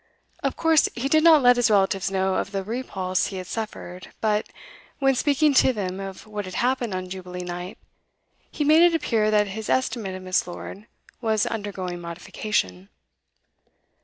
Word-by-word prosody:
Of - - -2
course 325 -2 +4
he 245 +3 -2
did 310 +2 +3
not 320 -4 +7
let 245 0 +6
his 245 -2 +3
relatives 195 -1 +2
know 190 0 0
of 190 - -2
the 195 -1 -2
repulse 190 -5 -2
he 195 - -6
had 185 - -5
suffered, 185 -4 -6
but, 215 -1 0 0.5
when 270 -1 +3
speaking 290 +2 +2
to 260 -1 +5
them 190 -3 -4
of 195 -1 -7
what 210 -2 -5
had 185 - -7
happened 245 -4 0
on 185 0 -4
Jubilee 180 -1 -7
night, 180 +1 -6 0.7
he 300 - -2
made 310 +3 +6
it 345 -1 +5
appear 225 -9 +1
that 210 -1 +2
his 215 +2 -6
estimate 230 -7 0
of 185 - -8
Miss. 185 -1 0
Lord 195 +4 -8 0.3
was 220 -2 +1
undergoing 190 -5 -4
modification. 170 - -3
210 Hz, 170 wpm, -24 LUFS, 185-245 Hz, 0.7 s, not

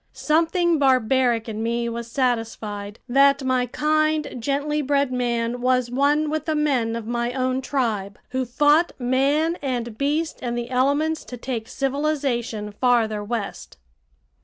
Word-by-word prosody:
Something 330 +1 +2
barbaric 255 -3 +2
in 220 -1 -4
me 235 +1 -1
was 235 0 -5
satisfied 225 -5 -2
that 275 +2 +4
my 255 -1 +1
kind, 310 +3 +1
gently 285 +4 -1
bred 280 -1 +1
man 240 -1 -1
was 250 -1 +1
one 295 +3 +2
with 310 -1 -2
the 315 - 0
men 260 -7 +1
of 230 -2 -5
my 240 +1 -2
own 255 0 0
tribe, 220 -8 -2
who 260 0 -1
fought 295 +7 +3
man 280 +7 +1
and 240 -5 -3
beast 300 +3 -1
and 240 -1 -2
the 240 +1 -4
elements 285 +5 +1
to 245 - -8
take 235 -2 -4
civilization 270 -6 -2
farther 220 -2 +1
west. 205 - -5
255 Hz, 140 wpm, -23 LUFS, 235-290 Hz, -, that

